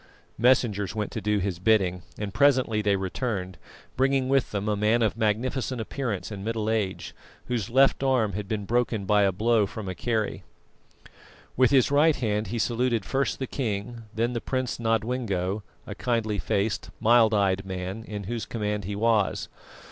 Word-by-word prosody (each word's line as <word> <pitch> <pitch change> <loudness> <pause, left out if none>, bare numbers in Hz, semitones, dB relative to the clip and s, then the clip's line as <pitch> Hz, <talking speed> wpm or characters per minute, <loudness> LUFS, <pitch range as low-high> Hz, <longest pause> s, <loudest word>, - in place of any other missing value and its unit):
Messengers 110 -6 +2
went 105 -2 -2
to 110 - -4
do 105 +1 +1
his 95 -3 -2
bidding, 95 -3 +2 0.2
and 100 -2 -4
presently 130 -6 +3
they 100 -1 +2
returned, 95 -1 -3 0.4
bringing 135 0 +2
with 135 -2 +2
them 100 0 -3
a 105 - +1
man 110 +3 +2
of 110 - +1
magnificent 120 +4 -1
appearance 110 -3 -3
and 100 -2 -6
middle 110 0 -1
age, 105 -4 -2 0.3
whose 120 -6 -2
left 135 +3 +4
arm 125 -7 +2
had 105 +1 -4
been 105 -1 -3
broken 115 -2 0
by 105 +1 +3
a 100 -1 +3
blow 110 +2 +2
from 105 0 -7
a 95 - -3
kerry. 110 +2 -2 1.1
With 130 0 +4
his 135 -1 +4
right 150 +2 +5
hand 105 -2 -1
he 115 +5 -3
saluted 115 -2 0
first 135 0 0
the 130 - -3
king, 115 -3 -3
then 115 +3 -1
the 120 - -2
Prince 130 -3 -2
Nodwengo, 115 -4 -1 0.2
a 105 - -6
kindly 110 -2 -1
faced, 100 -4 -1
mild 115 0 +5
eyed 95 -1 +2
man, 95 +2 -5
in 105 -1 -6
whose 115 +3 -4
command 105 -3 -2
he 100 +1 -4
was. 110 -1 +1
110 Hz, 170 wpm, -26 LUFS, 100-120 Hz, 1.1 s, right